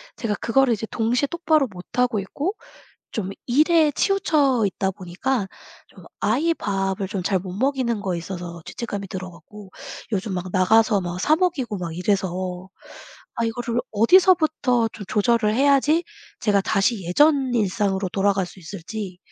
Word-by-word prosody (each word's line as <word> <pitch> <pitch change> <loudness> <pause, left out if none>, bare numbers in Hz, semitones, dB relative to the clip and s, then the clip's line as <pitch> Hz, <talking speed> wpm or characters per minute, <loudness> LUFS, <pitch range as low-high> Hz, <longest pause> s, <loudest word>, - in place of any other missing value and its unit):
제가 215 -3 -2
그거를 240 +3 +2
이제 220 +1 -3
동시에 240 +5 +1
똑바로 315 -5 +2
못하고 215 +4 -1
있고 285 - -3 0.6
좀 195 -4 -3 0.2
일에 305 +4 +4
치우쳐 295 - +2
있다 190 0 -1
보니까 190 +5 -2 0.4
좀 185 - -17 0.2
아이 270 +11 +2
밥을 195 -3 -2
좀 195 -2 -3
잘 190 +1 +1
못 185 0 -7
먹이는 245 0 0
거에 185 -3 -2
있어서 175 -1 -7
죄책감이 205 -4 -5
들어 185 0 -6
갖고 190 +4 -14 0.4
요즘 195 0 -2
막 180 0 -3
나가서 210 +2 +4
막 180 0 -4
사 310 +7 +3
먹이고 295 - -1
막 170 -2 -5
이래서 185 -1 -2 0.7
아, 235 - 0
이거를 235 +1 -2
어디서부터 290 - +4
좀 210 - -8
조절을 215 0 +2
해야지 285 +5 +3 0.4
제가 205 -3 +2
다시 205 0 +1
예전 270 - +3
일상으로 200 -3 0
돌아갈 195 -1 +1
수 180 - -14
있을지 185 +2 -7
210 Hz, 315 characters per minute, -23 LUFS, 190-260 Hz, 0.7 s, 일에